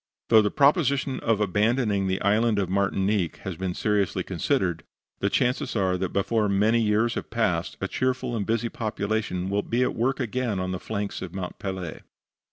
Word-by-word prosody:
Though 110 Hz, -2 st, +7 dB
the 105 Hz, -, +1 dB
proposition 140 Hz, -, +2 dB
of 115 Hz, -2 st, +1 dB
abandoning 105 Hz, 0 st, +1 dB
the 95 Hz, 0 st, 0 dB
Island 105 Hz, +2 st, +3 dB
of 95 Hz, -3 st, -1 dB
Martinique 95 Hz, -2 st, +1 dB
has 95 Hz, -3 st, -4 dB
been 90 Hz, +1 st, -3 dB
seriously 105 Hz, -4 st, 0 dB
considered, 85 Hz, -3 st, -1 dB, 0.4 s
the 100 Hz, -, +1 dB
chances 125 Hz, +2 st, 0 dB
are 95 Hz, -3 st, +1 dB
that, 90 Hz, 0 st, -2 dB
before 105 Hz, +2 st, +1 dB
many 105 Hz, +4 st, +3 dB
years 110 Hz, +2 st, +2 dB
have -, -, -5 dB
passed, -, -, -1 dB
a -, -, -2 dB
cheerful 130 Hz, -2 st, -1 dB
and 105 Hz, -, -1 dB
busy 115 Hz, +3 st, 0 dB
population 110 Hz, -6 st, -2 dB
will 100 Hz, +1 st, +1 dB
be 120 Hz, +4 st, 0 dB
at -, -, 0 dB
work 130 Hz, +5 st, 0 dB
again 120 Hz, -4 st, -1 dB
on 90 Hz, 0 st, -2 dB
the 90 Hz, -, -3 dB
flanks 105 Hz, -1 st, -4 dB
of 95 Hz, -1 st, -7 dB
Mont 90 Hz, -2 st, -5 dB
Pelee. 95 Hz, -4 st, -5 dB
105 Hz, 180 wpm, -26 LUFS, 95-115 Hz, 0.4 s, Though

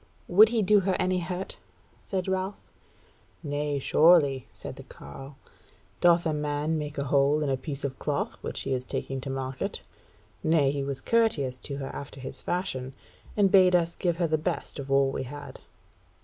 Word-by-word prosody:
"Would 210 Hz, +5 st, +7 dB
he 225 Hz, -2 st, +1 dB
do 205 Hz, +2 st, +5 dB
her 190 Hz, -1 st, 0 dB
any 185 Hz, 0 st, +1 dB
hurt?" 180 Hz, +2 st, -5 dB, 0.4 s
said 190 Hz, -2 st, -3 dB
Ralph. 190 Hz, +1 st, -2 dB, 0.8 s
"Nay, 145 Hz, -1 st, -1 dB
surely," 145 Hz, -3 st, +4 dB
said -, -, -9 dB
the -, -, -8 dB
carle; 135 Hz, -, -11 dB, 0.6 s
"doth 175 Hz, 0 st, +4 dB
a 160 Hz, -, +1 dB
man 150 Hz, +1 st, -1 dB
make 150 Hz, 0 st, -5 dB
a 140 Hz, -, 0 dB
hole 140 Hz, +2 st, +3 dB
in 145 Hz, -, -1 dB
a -, -, +2 dB
piece 140 Hz, +1 st, -6 dB
of 135 Hz, -2 st, -4 dB
cloth -, -, -2 dB
which -, -, -4 dB
he -, -, -2 dB
is 125 Hz, -1 st, -1 dB
taking 135 Hz, +1 st, -4 dB
to 135 Hz, -, -5 dB
market? 135 Hz, -1 st, -4 dB, 0.6 s
Nay, 155 Hz, -4 st, +3 dB
he 140 Hz, 0 st, -2 dB
was 135 Hz, -1 st, -4 dB
courteous 150 Hz, -, +1 dB
to 140 Hz, +1 st, -5 dB
her 135 Hz, -1 st, -5 dB
after 140 Hz, -1 st, -8 dB
his 130 Hz, -, -8 dB
fashion, 135 Hz, -8 st, -3 dB, 0.4 s
and 200 Hz, -2 st, +4 dB
bade 185 Hz, -2 st, +6 dB
us 170 Hz, -1 st, +1 dB
give 175 Hz, -2 st, 0 dB
her 170 Hz, -1 st, +1 dB
the 155 Hz, -1 st, +1 dB
best 155 Hz, -, -3 dB
of 135 Hz, 0 st, -6 dB
all 135 Hz, 0 st, +4 dB
we -, -, -3 dB
had." 140 Hz, +1 st, -8 dB
145 Hz, 185 wpm, -27 LUFS, 135-180 Hz, 0.8 s, Would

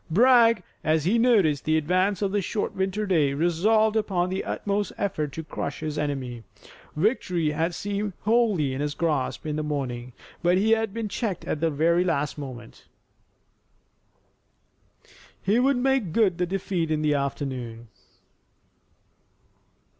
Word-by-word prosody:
Bragg, 230 Hz, +1 st, +5 dB, 0.2 s
as 155 Hz, -1 st, +1 dB
he 220 Hz, +6 st, +3 dB
noticed 200 Hz, -, +3 dB
the 155 Hz, 0 st, +2 dB
advance 185 Hz, +5 st, +1 dB
of 195 Hz, -, 0 dB
the 205 Hz, 0 st, +1 dB
short 205 Hz, +3 st, -2 dB
winter 190 Hz, +2 st, -1 dB
day, 155 Hz, -8 st, +2 dB
resolved 210 Hz, +8 st, +2 dB
upon 190 Hz, -5 st, 0 dB
the 190 Hz, -, -2 dB
utmost 205 Hz, 0 st, -2 dB
effort 155 Hz, -7 st, -2 dB
to 160 Hz, -, -5 dB
crush 145 Hz, -2 st, -5 dB
his 155 Hz, -1 st, -3 dB
enemy. 135 Hz, -5 st, -3 dB, 0.5 s
Victory 175 Hz, -3 st, +1 dB
had 165 Hz, +3 st, -1 dB
seemed 205 Hz, 0 st, -3 dB
wholly 210 Hz, -, +2 dB
in 135 Hz, -, -3 dB
his 145 Hz, 0 st, -2 dB
grasp 155 Hz, -6 st, -1 dB
in 150 Hz, -1 st, -2 dB
the -, -, -1 dB
morning, 125 Hz, -5 st, -4 dB, 0.3 s
but 175 Hz, +1 st, +3 dB
he 215 Hz, +4 st, +2 dB
had 225 Hz, -2 st, +2 dB
been 225 Hz, +1 st, -3 dB
checked 200 Hz, -2 st, -3 dB
at 155 Hz, -, -2 dB
the 165 Hz, -, +2 dB
last 160 Hz, -1 st, +1 dB
moment. 130 Hz, -5 st, -9 dB, 2.5 s
He 205 Hz, +5 st, +2 dB
would 270 Hz, +1 st, +3 dB
make 255 Hz, -9 st, +1 dB
good 195 Hz, -6 st, +2 dB
the 180 Hz, -, +1 dB
defeat 180 Hz, -3 st, -2 dB
in 155 Hz, -1 st, 0 dB
the 150 Hz, -1 st, +2 dB
afternoon. 130 Hz, -5 st, -3 dB
175 Hz, 145 wpm, -25 LUFS, 150-205 Hz, 2.5 s, Bragg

